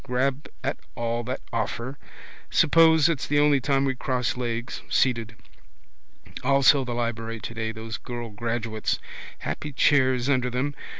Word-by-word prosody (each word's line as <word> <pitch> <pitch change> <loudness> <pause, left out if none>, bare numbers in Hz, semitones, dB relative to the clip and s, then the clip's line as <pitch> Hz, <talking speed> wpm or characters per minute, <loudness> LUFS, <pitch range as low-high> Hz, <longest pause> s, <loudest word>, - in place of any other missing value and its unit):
Grab 130 +3 -1 0.2
at - - -2 0.2
all 120 0 -2
that 130 +2 -4
offer. 120 +4 -3 0.5
Suppose 160 -1 +5
it's 165 -5 -1
the 145 - +1
only 145 -1 +5
time 135 0 +2
we 135 - +1
cross 125 -1 -1
legs, 120 -1 -3
seated. 115 -3 +1 1.1
Also 140 +1 +5
the 120 -2 -4
library 115 -1 -3
today: 110 0 -4
those 110 0 -6
girl 120 -2 -6
graduates. 115 0 -2 0.4
Happy 110 - -4
chairs 130 -2 +3
under 130 -3 +2
them. 130 +4 -1
125 Hz, 135 wpm, -25 LUFS, 115-140 Hz, 1.1 s, Suppose